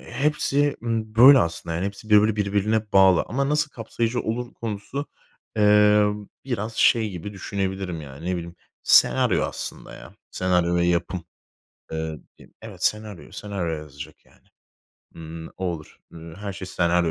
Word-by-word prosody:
hepsi, 145 +2 0
ımm, 110 -2 -2
böyle 130 +4 +9
aslında 85 -2 -2
yani 90 +4 -1
hepsi 100 +2 -8
böyle 105 +1 +5
birbirine 105 +1 0
bağlı 95 -2 +6
ama 140 +3 -1
nasıl 150 0 +1
kapsayıcı 115 0 -2
olur 120 +2 -4
konusu, 115 +6 -5 0.5
emm, 105 0 +4 0.2
biraz 115 -3 -4
şey 110 -3 +3
gibi 90 +3 -7
düşünebilirim 95 -3 -3
yani, 70 +3 -10
ne 90 - 0
bileyim, 85 0 -7 0.3
senaryo - - +4
aslında - - -6
ya, - - -13 0.2
senaryo 90 -1 +1
ve 85 - +2
yapım. 85 0 -1 0.7
Eee, 80 -1 -4 0.2
dim - - -18
evet, - - -9
senaryo, 105 -3 -2
senaryo 95 -5 -4
yazacak 75 -2 -11
yani. - - -27 0.7
Imm, 80 0 -8
o 95 - -5
olur. 85 -3 -6
Iıı, 80 -1 -10
her 100 -1 -5
şey 95 0 -8
senaryo 85 -1 +1
100 Hz, 145 wpm, -24 LUFS, 85-110 Hz, 0.7 s, böyle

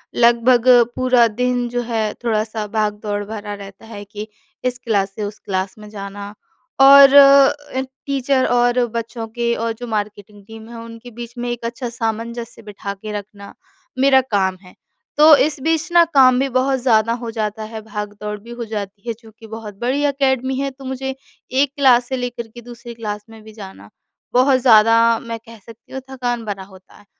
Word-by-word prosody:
लगभग 240 +1 +3 0.3
पूरा 250 -2 +3
दिन 245 +2 -1
जो 245 0 -2
है, 220 -2 -1
थोड़ा-सा 220 -1 -1
भाग-दौड़ 210 -1 -1
भरा 210 -1 -6
रहता 200 +1 -11
है 215 -2 -9
कि 210 +1 -8 0.4
इस 250 -1 -1
क्लास 200 -4 0
से 215 - -4
उस 205 +1 -6
क्लास 190 0 -3
में 210 -1 -12
जाना 200 0 -8 0.5
और 275 0 +9
अ, 280 -1 +5 0.2
टीचर 275 -1 +1
और 245 0 +2
बच्चों 230 0 -4
के 235 0 0
और 230 - -1
जो 245 - -5
मार्केटिंग 205 -1 -5
टीम 225 +1 -12
है 235 - -9
उनके 230 +1 -11
बीच 235 0 -7
में 240 0 -3
एक 240 -1 -5
अच्छा 240 +1 -4
सामंजस्य 230 +1 -4
बिठा 200 0 -6
के 210 +2 -9
रखना, 200 0 -13 0.5
मेरा 265 0 +5
काम 190 -2 +1
है। 180 - -17 0.4
तो 305 +1 +8
इस 300 -1 -2
बीच 320 +1 0
ना 345 0 +6
काम 255 -2 +6
भी 270 - +1
बहुत 265 +1 +2
ज़्यादा 230 -2 +2
हो 235 -1 -6
जाता 215 0 -3
है 220 - -6
भाग-दौड़ 210 0 -6
भी 230 +3 -13
हो 235 - -4
जाती 200 +1 -6
है 230 - -1
चूँकि 225 -1 -16
बहुत 220 -2 -8
बड़ी 260 +4 -1
अकेडमी 265 -2 0
है 275 0 -1
तो 270 0 -14
मुझे 265 0 -4 0.5
1 285 - +1
क्लास 255 -4 +4
से 260 - -2
लेकर 245 -2 -5
के 240 +2 -13
दूसरी 240 0 -11
क्लास 210 -2 -6
में 225 -1 -13
भी 220 - -13
जाना, 190 - -12 0.4
बहुत 255 +1 +4
ज़्यादा 225 -2 +6 0.2
मैं 230 -1 -6
कह 230 +1 -15
सकती 230 +3 -17
हूँ 265 - -5
थकान 245 -3 -3
भरा 200 -2 -5
होता 190 -1 -18
है। 205 - -20
230 Hz, 185 wpm, -19 LUFS, 210-255 Hz, 0.5 s, और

